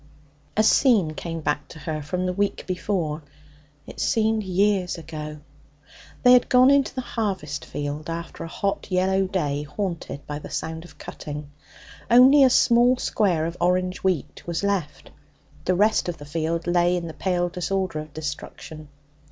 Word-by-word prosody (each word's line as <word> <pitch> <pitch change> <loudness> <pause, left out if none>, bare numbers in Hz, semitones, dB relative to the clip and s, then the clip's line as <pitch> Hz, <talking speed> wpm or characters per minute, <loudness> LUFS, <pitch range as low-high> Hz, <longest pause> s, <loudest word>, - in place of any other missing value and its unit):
A 215 - +5
scene 215 - +4
came 165 +1 -5
back 150 -1 -1
to - - -12
her 155 0 -4
from 180 +5 -3
the 180 - -1
week 200 +2 -1
before 180 -4 -2 0.6
it - - -11
seemed 220 0 +1
years 190 -1 +1
ago. 150 -2 -7 0.8
They 250 0 +8
had 250 - +5
gone 255 +2 +6
into 280 -1 +2
the 260 - -2
harvest 190 - -3
field 145 +2 -5
after 170 +1 -5
a - - -5
hot, 200 +4 -2
yellow 190 +1 +2
day 145 -7 -1
haunted 170 -2 -5
by 145 0 -5
the - - -9
sound 160 +1 -4
of 175 - -16
cutting. 150 -1 -8 0.6
Only 260 +4 +7
a 260 - +7
small 240 +1 +4
square 185 -10 +1
of 170 +1 -4
orange 180 +1 +1
wheat 185 -7 -1
was 170 +2 -2
left; 195 -7 -2 0.5
the 185 - +2
rest 210 -1 +2
of 170 - -4
the 145 - -10
field 165 +2 -2
lay 175 0 +2
in 170 - -4
the 160 - -6
pale 175 +2 0
disorder 180 -1 -2
of 155 0 -8
destruction. 155 0 -7
175 Hz, 165 wpm, -24 LUFS, 155-200 Hz, 0.8 s, They